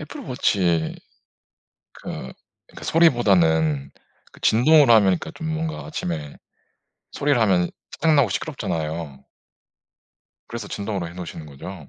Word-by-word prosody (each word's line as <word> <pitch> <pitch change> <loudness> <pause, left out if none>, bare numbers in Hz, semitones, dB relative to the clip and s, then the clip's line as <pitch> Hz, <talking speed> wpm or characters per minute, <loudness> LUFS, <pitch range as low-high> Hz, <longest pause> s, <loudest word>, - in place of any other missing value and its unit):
애플워치에 95 - -1 1.0
그 - - -17
그러니까 65 - -12
소리보다는 80 - +3 0.4
그 - - -19
진동으로 135 +3 +5
하면 110 -2 +6
그러니까 95 -2 0
좀 160 0 -6
뭔가 160 0 -4
아침에 80 - -5 0.8
소리를 140 -4 +1
하면 90 -5 +2 0.2
짜증나고 150 -7 +3
시끄럽잖아요. 80 -6 -4 1.2
그래서 115 -3 -7
진동으로 100 -4 -4
해 85 - -12
놓으시는 85 -3 -8
거죠? 75 +2 -10
95 Hz, 310 characters per minute, -23 LUFS, 80-125 Hz, 1.2 s, 하면